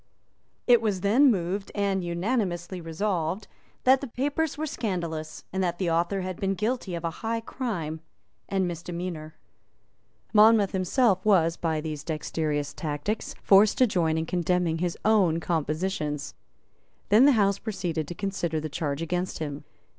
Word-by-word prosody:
It 240 -2 +6
was 205 -5 -1
then 240 +9 +5
moved 195 -1 -1
and 200 -2 0
unanimously 175 -1 -2
resolved 170 +2 -2 0.4
that 260 +1 +5
the 275 - -4
papers 285 +5 -1
were 310 - -2
scandalous, 170 - -4
and 190 0 0
that 175 -1 -1
the 175 -3 0
author 170 +4 +1
had 185 -1 -5
been 195 0 0
guilty 215 -3 -2
of 170 - -5
a 165 - -1
high 230 0 -1
crime 180 - -4 0.5
and 190 -2 +1
misdemeanour. 170 -2 -5 1.0
Monmouth 215 -1 +6
himself 190 +1 +2
was, 170 -6 +4
by 160 -3 -1
these 150 -2 -5
dexterous 155 -2 -2
tactics, 155 +7 -3
forced 200 +2 +6
to 255 - +6
join 170 -7 +1
in 160 - -1
condemning 175 -1 0
his 175 0 -1
own 195 -7 +4
compositions. 155 -2 -2 0.8
Then 220 +6 +7
the 285 - +6
House 200 -3 +2
proceeded 175 -8 -3
to 175 - -6
consider 175 -5 -2
the 155 0 -4
charge 145 0 -2
against 180 +2 -2
him. 145 -2 -5
180 Hz, 150 wpm, -27 LUFS, 165-210 Hz, 1.0 s, Then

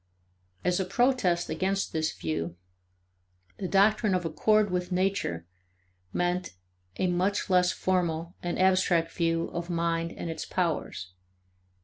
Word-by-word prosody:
As 180 +1 +2
a 190 - 0
protest 220 -5 +2
against 195 +1 -1
this 160 -1 0
view, 80 +1 -4 1.0
the 190 - -2
doctrine 205 +1 +3
of 180 -1 -1
accord 210 +5 +2
with 180 0 -2
nature 180 - 0 0.7
meant 180 - -1 0.4
a - - +1
much 185 +3 0
less 180 -1 +4
formal 170 -2 -1
and 175 0 -2
abstract 185 -3 +3
view 165 -1 0
of 170 +1 -5
mind 170 -1 0
and - - -6
its 165 - -4
powers. 155 - -2
180 Hz, 125 wpm, -28 LUFS, 165-190 Hz, 1.0 s, less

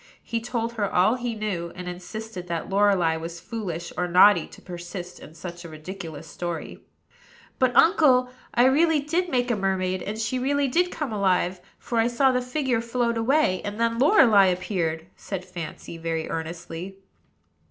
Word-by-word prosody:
He 230 0 -3
told 235 -1 -3
her 205 -4 -1
all 185 +5 +4
he 245 -2 -3
knew, 190 -6 -3
and 180 0 -7
insisted 180 +2 -7
that 170 +2 -4
Lorelei 195 -5 +3
was 165 +1 -6
foolish 175 -6 -5
or 180 - -1
naughty 180 0 +6
to - - -14
persist 175 0 -8
in 155 - -13
such 175 +1 -8
a 170 - -9
ridiculous 160 -1 -8
story. 170 +1 -5 0.8
"But, 255 -2 +2
uncle, 255 -7 +5 0.2
I 240 +1 +4
really 310 +4 +4
did 335 +5 -1
make 245 -3 +1
a - - +2
mermaid; 185 -2 -1
and 210 +4 -4
she 225 +3 -1
really 280 +2 +1
did 355 +7 +2
come 295 -10 -4
alive, 185 -2 +1 0.2
for 235 - -2
I 225 - +3
saw 260 +3 +3
the 250 0 +1
figure 250 -2 -1
float 235 0 -1
away, 225 -4 +2
and 205 +2 -5
then 230 0 +1
Lorelei 245 - +6
appeared," 175 -3 -1
said 185 -2 -6
Fancy, 170 -2 -8
very 165 -1 -2
earnestly. 165 +3 -6
200 Hz, 170 wpm, -25 LUFS, 175-245 Hz, 0.8 s, naughty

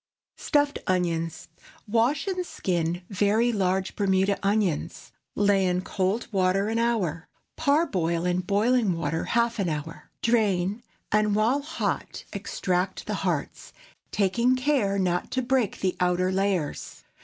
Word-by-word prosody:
STUFFED 290 -1 +1
ONIONS. 165 -3 -1 0.4
Wash 235 +7 +1
and 370 -2 -1
skin 175 - -2
very 210 +5 +2
large 190 -2 0
Bermuda 195 0 +1
onions. 200 -6 -1 0.2
Lay 200 -1 +3
in 180 0 +1
cold 195 +4 -1
water 195 +1 +2
an 225 +1 0
hour. 190 -9 0 0.3
Parboil 195 - +1
in 180 0 +1
boiling 205 +1 +2
water 165 0 -2
half 235 -1 +1
an 190 -3 +1
hour. 155 +1 -6
Drain, 210 -3 +1 0.3
and 210 -1 +2
while 230 +7 +2
hot 305 +3 -3
extract 180 +1 -2
the - - -3
hearts, - - -3 0.4
taking 235 +6 +2
care 255 -7 +1
not 180 -2 0
to 260 - -1
break 250 -4 0
the 185 -1 0
outer 180 +1 +1
layers. 190 -5 -2
200 Hz, 130 wpm, -26 LUFS, 180-235 Hz, 0.4 s, Lay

